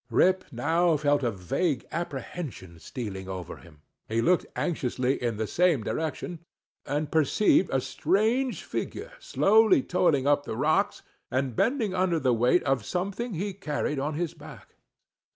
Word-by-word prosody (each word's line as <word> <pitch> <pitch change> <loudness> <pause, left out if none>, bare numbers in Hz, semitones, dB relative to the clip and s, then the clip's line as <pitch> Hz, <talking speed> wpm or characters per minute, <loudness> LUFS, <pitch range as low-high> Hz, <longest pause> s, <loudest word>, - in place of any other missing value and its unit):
Rip 185 +10 +3
now 160 +6 +2
felt 145 0 +2
a 120 - +1
vague 115 - -1
apprehension 135 - -6
stealing 95 0 -6
over 95 -2 -6
him; 75 -4 -18 0.3
he 115 +1 0
looked 175 +9 +2
anxiously 130 -6 -1
in 120 -3 -1
the 110 - -1
same 165 - +2
direction, 160 +4 -3 0.5
and 150 +1 -2
perceived 160 +5 +3
a 135 - +2
strange 215 - 0
figure - - -5
slowly 215 - +4
toiling 160 -7 +2
up 145 0 +3
the 110 - -5
rocks, 155 +9 +1 0.3
and 130 -2 -1
bending 230 - +1
under 180 -3 +1
the 130 -4 +2
weight 120 +9 +3
of 135 -5 +1
something 200 - -3
he 195 +4 -3
carried 150 -5 -2
on 145 +2 -2
his 170 0 -2
back. 155 -3 -13
150 Hz, 150 wpm, -27 LUFS, 125-180 Hz, 0.5 s, slowly